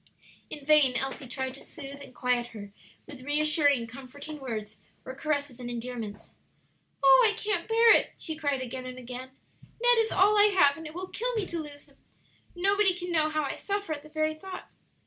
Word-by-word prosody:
In 290 Hz, -2 st, -8 dB
vain 295 Hz, -4 st, +5 dB
Elsie 270 Hz, 0 st, -3 dB
tried 260 Hz, +1 st, -4 dB
to 275 Hz, -, -9 dB
soothe 280 Hz, -3 st, -9 dB
and 255 Hz, -, -12 dB
quiet 245 Hz, -1 st, 0 dB
her 205 Hz, -4 st, -10 dB, 0.3 s
with 285 Hz, -4 st, -11 dB
reassuring, 290 Hz, -2 st, +2 dB
comforting 275 Hz, +5 st, -10 dB
words 215 Hz, -5 st, -5 dB, 0.3 s
or 260 Hz, -, -6 dB
caresses 285 Hz, -2 st, -2 dB
and 245 Hz, -1 st, -6 dB
endearments. 230 Hz, -3 st, -6 dB, 0.7 s
"Oh, 270 Hz, -, +8 dB
I 420 Hz, -, -8 dB
can't 415 Hz, -5 st, -1 dB
bear 455 Hz, +1 st, +6 dB
it!" -, -, +3 dB
she 320 Hz, -, -4 dB
cried 285 Hz, -4 st, -1 dB
again 255 Hz, +1 st, -6 dB
and 255 Hz, 0 st, -8 dB
again. 250 Hz, +1 st, -8 dB, 0.5 s
"Ned 485 Hz, 0 st, +5 dB
is 450 Hz, 0 st, +1 dB
all 415 Hz, +2 st, +4 dB
I 410 Hz, -1 st, +5 dB
have, 285 Hz, -6 st, +6 dB
and 325 Hz, +1 st, -8 dB
it 305 Hz, -, -11 dB
will 370 Hz, +1 st, -5 dB
kill -, -, -2 dB
me 430 Hz, -3 st, 0 dB
to 340 Hz, -2 st, -4 dB
lose 290 Hz, -2 st, -9 dB
him. -, -, -25 dB, 0.6 s
Nobody 395 Hz, +1 st, +3 dB
can 355 Hz, 0 st, -5 dB
know 310 Hz, -2 st, +3 dB
how 310 Hz, 0 st, -1 dB
I 280 Hz, -, -2 dB
suffer 405 Hz, -4 st, -3 dB
at 290 Hz, -, -6 dB
the 305 Hz, -, -15 dB
very 310 Hz, 0 st, 0 dB
thought." 370 Hz, +4 st, -9 dB
290 Hz, 200 wpm, -28 LUFS, 255-350 Hz, 0.7 s, Oh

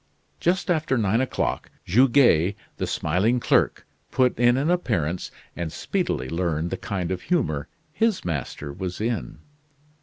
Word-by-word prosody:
Just 180 Hz, +2 st, +1 dB
after 155 Hz, -5 st, +1 dB
nine 110 Hz, +1 st, +2 dB
o'clock, 130 Hz, -, -2 dB, 0.2 s
Goguet, 115 Hz, -, +4 dB, 0.2 s
the -, -, -2 dB
smiling 100 Hz, +11 st, +1 dB
clerk, -, -, +2 dB, 0.2 s
put 125 Hz, -1 st, +2 dB
in 120 Hz, +1 st, +5 dB
an 145 Hz, +5 st, +1 dB
appearance 95 Hz, -, -1 dB, 0.3 s
and 85 Hz, -2 st, -4 dB
speedily 65 Hz, -3 st, -2 dB
learned 85 Hz, 0 st, -1 dB
the -, -, -2 dB
kind 95 Hz, -4 st, -3 dB
of 95 Hz, -, -2 dB
humor 80 Hz, -, 0 dB, 0.3 s
his 220 Hz, +2 st, +1 dB
master 75 Hz, -2 st, -4 dB
was 90 Hz, +2 st, -5 dB
in. 115 Hz, +1 st, -2 dB
105 Hz, 140 wpm, -24 LUFS, 85-130 Hz, 0.3 s, in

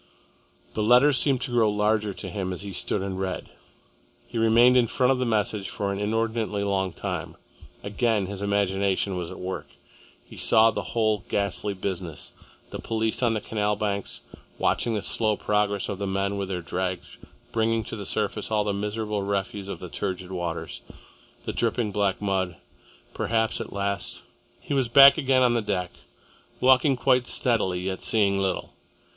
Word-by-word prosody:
The 110 Hz, -, -2 dB
letters 125 Hz, +5 st, +6 dB
seemed 135 Hz, -4 st, +3 dB
to 130 Hz, -, -1 dB
grow 115 Hz, -3 st, +3 dB
larger 105 Hz, 0 st, +1 dB
to -, -, -6 dB
him 95 Hz, -3 st, -3 dB
as 90 Hz, -, -5 dB
he 100 Hz, -1 st, -7 dB
stood 95 Hz, +2 st, -2 dB
and 95 Hz, -1 st, -4 dB
read. 95 Hz, -1 st, -4 dB, 0.8 s
He 115 Hz, -, -4 dB
remained 115 Hz, +3 st, +5 dB
in 125 Hz, -2 st, +4 dB
front 125 Hz, +3 st, +2 dB
of 130 Hz, -, +1 dB
the 125 Hz, -, 0 dB
message 105 Hz, -2 st, 0 dB
for 100 Hz, -1 st, -2 dB
an 100 Hz, -, -4 dB
inordinately 110 Hz, 0 st, -1 dB
long 95 Hz, -2 st, 0 dB
time. -, -, -5 dB, 0.5 s
Again 105 Hz, 0 st, 0 dB
his 100 Hz, +1 st, -6 dB
imagination 100 Hz, -1 st, 0 dB
was 90 Hz, -2 st, -4 dB
at -, -, -9 dB
work. 95 Hz, +1 st, -5 dB, 0.6 s
He -, -, -13 dB
saw 115 Hz, 0 st, +5 dB
the -, -, -3 dB, 0.2 s
whole 110 Hz, -4 st, +2 dB
ghastly 100 Hz, 0 st, -1 dB
business, 90 Hz, -4 st, -5 dB, 0.4 s
the -, -, -5 dB
police 110 Hz, +1 st, -1 dB
on 115 Hz, -2 st, +2 dB
the 105 Hz, -, -2 dB
canal 105 Hz, -1 st, -1 dB
banks, 100 Hz, -1 st, -2 dB, 0.3 s
watching 115 Hz, -2 st, +1 dB
the 105 Hz, -, -2 dB
slow 110 Hz, -2 st, +1 dB
progress 105 Hz, -1 st, 0 dB
of 100 Hz, -2 st, -4 dB
the 100 Hz, -, -2 dB
men 100 Hz, +1 st, -1 dB
with 100 Hz, -1 st, -3 dB
their 90 Hz, -3 st, -3 dB
drags 90 Hz, 0 st, -4 dB, 0.3 s
bringing 115 Hz, 0 st, +1 dB
to -, -, -6 dB
the 105 Hz, -, -6 dB
surface 105 Hz, 0 st, -1 dB
all 105 Hz, -1 st, +1 dB
the 105 Hz, -1 st, -1 dB
miserable 105 Hz, +1 st, -2 dB
refuse 100 Hz, 0 st, -3 dB
of -, -, -5 dB
the 90 Hz, -, -7 dB
turgid 90 Hz, +3 st, -4 dB
waters, 85 Hz, -2 st, -4 dB, 0.6 s
the -, -, -4 dB
dripping 110 Hz, -4 st, 0 dB
black 100 Hz, -1 st, 0 dB
mud, 95 Hz, -3 st, -1 dB, 0.6 s
perhaps 110 Hz, -1 st, 0 dB
at -, -, -7 dB
last.... 100 Hz, -1 st, -2 dB, 0.4 s
He -, -, -4 dB
was 135 Hz, -3 st, +2 dB
back 140 Hz, +5 st, +8 dB
again 130 Hz, -3 st, +3 dB
on 120 Hz, -1 st, +4 dB
the 120 Hz, -, +1 dB
deck, 90 Hz, -4 st, -2 dB, 0.7 s
walking 130 Hz, +1 st, +4 dB
quite 125 Hz, -1 st, +2 dB
steadily 100 Hz, -7 st, +1 dB
yet 95 Hz, 0 st, -3 dB
seeing 100 Hz, -3 st, +2 dB
little. 95 Hz, -2 st, -2 dB
105 Hz, 175 wpm, -25 LUFS, 95-115 Hz, 0.8 s, back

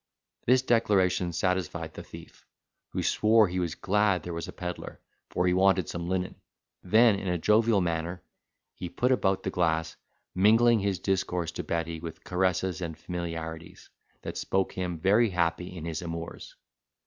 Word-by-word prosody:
This 125 Hz, +1 st, +5 dB
declaration 95 Hz, -7 st, +2 dB
satisfied 85 Hz, -2 st, -2 dB
the -, -, -8 dB
thief, -, -, -13 dB, 0.4 s
who -, -, -3 dB
swore 110 Hz, 0 st, +4 dB
he 90 Hz, +1 st, -3 dB
was 85 Hz, -2 st, -2 dB
glad 100 Hz, -3 st, +1 dB
there 85 Hz, -, -5 dB
was 85 Hz, 0 st, -4 dB
a -, -, -6 dB
pedlar, 90 Hz, -1 st, -6 dB, 0.3 s
for 90 Hz, -, 0 dB
he 90 Hz, -, +3 dB
wanted 95 Hz, -1 st, +3 dB
some 85 Hz, 0 st, -4 dB
linen. 95 Hz, 0 st, -2 dB, 0.4 s
Then, 110 Hz, +1 st, +4 dB
in 100 Hz, -, -5 dB
a 90 Hz, 0 st, +1 dB
jovial 105 Hz, +3 st, +3 dB
manner, 85 Hz, +1 st, -2 dB, 0.5 s
he 90 Hz, -, -6 dB
put 125 Hz, +9 st, 0 dB
about 95 Hz, -7 st, +1 dB
the -, -, -2 dB
glass, 80 Hz, -2 st, 0 dB, 0.4 s
mingling 115 Hz, +4 st, +5 dB
his 100 Hz, -1 st, 0 dB
discourse 90 Hz, -3 st, -1 dB
to -, -, -5 dB
Betty 85 Hz, -1 st, -2 dB
with 80 Hz, 0 st, -8 dB
caresses 90 Hz, -1 st, 0 dB
and 80 Hz, -3 st, -4 dB
familiarities, 85 Hz, -1 st, -6 dB, 0.3 s
that -, -, -5 dB
spoke 95 Hz, 0 st, 0 dB
him 90 Hz, -2 st, -3 dB
very 105 Hz, +7 st, +3 dB
happy 90 Hz, -1 st, 0 dB
in 80 Hz, -, -6 dB
his 80 Hz, -2 st, -3 dB
amours. 85 Hz, -1 st, -7 dB
90 Hz, 160 wpm, -28 LUFS, 85-100 Hz, 0.5 s, This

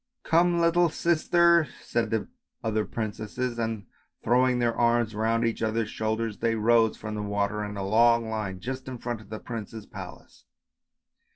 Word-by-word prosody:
" -, -, -58 dB
Come, 170 Hz, +1 st, +3 dB
little 170 Hz, +1 st, +4 dB
sister! 170 Hz, 0 st, +3 dB
" -, -, -18 dB
said 115 Hz, -2 st, -1 dB
the 110 Hz, -1 st, -1 dB, 0.4 s
other 110 Hz, -1 st, 0 dB
princesses, 115 Hz, +2 st, -4 dB
and, 110 Hz, -3 st, -2 dB, 0.4 s
throw 125 Hz, +3 st, +4 dB
ing 125 Hz, -1 st, +1 dB
their 120 Hz, -1 st, +1 dB
arms 120 Hz, -1 st, +2 dB
round 115 Hz, +2 st, +1 dB
each 115 Hz, -, -1 dB
other's 110 Hz, 0 st, -1 dB
shoulders, 110 Hz, 0 st, -2 dB
they 115 Hz, 0 st, +1 dB
rose 115 Hz, 0 st, +3 dB
from 110 Hz, 0 st, -6 dB
the 105 Hz, -, -3 dB
water 100 Hz, +1 st, -1 dB
in 105 Hz, 0 st, -5 dB
a 95 Hz, -, -3 dB
long 115 Hz, +2 st, +4 dB
line, 105 Hz, -4 st, -3 dB
just 130 Hz, +5 st, -5 dB
in 130 Hz, -1 st, -5 dB
front 120 Hz, -2 st, -4 dB
of 105 Hz, -, -17 dB
the 110 Hz, -, -5 dB
prince's 110 Hz, -2 st, -7 dB
palace. -, -, -11 dB
115 Hz, 180 wpm, -27 LUFS, 110-125 Hz, 0.4 s, little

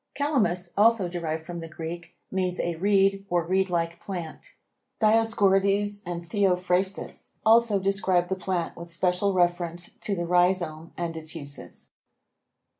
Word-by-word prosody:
Calamus, 210 Hz, -, 0 dB
also 215 Hz, -2 st, +4 dB
derived 160 Hz, -2 st, -4 dB
from 170 Hz, +1 st, -6 dB
the 165 Hz, -, -7 dB
Greek, 170 Hz, +2 st, -7 dB, 0.2 s
means 185 Hz, -1 st, -1 dB
a 170 Hz, -, 0 dB
reed 195 Hz, +1 st, +3 dB
or 175 Hz, -1 st, +1 dB
reed 190 Hz, +2 st, +1 dB
like 170 Hz, -1 st, -1 dB
plant. 175 Hz, -5 st, -7 dB, 0.4 s
Dioscorides 205 Hz, -2 st, +3 dB
and 175 Hz, -1 st, -4 dB
Theophrastus 185 Hz, -1 st, 0 dB
also 225 Hz, -1 st, +5 dB
describe 190 Hz, -2 st, +1 dB
the 190 Hz, -, -1 dB
plant 185 Hz, -2 st, -2 dB
with 170 Hz, 0 st, -7 dB
special 180 Hz, +3 st, +1 dB
reference 175 Hz, -1 st, 0 dB
to 200 Hz, -, -1 dB
the 175 Hz, -1 st, -2 dB
rhizome 175 Hz, -2 st, +1 dB
and 170 Hz, -1 st, -3 dB
its 160 Hz, 0 st, -5 dB
uses. 140 Hz, -3 st, -7 dB
180 Hz, 135 wpm, -26 LUFS, 170-195 Hz, 0.4 s, also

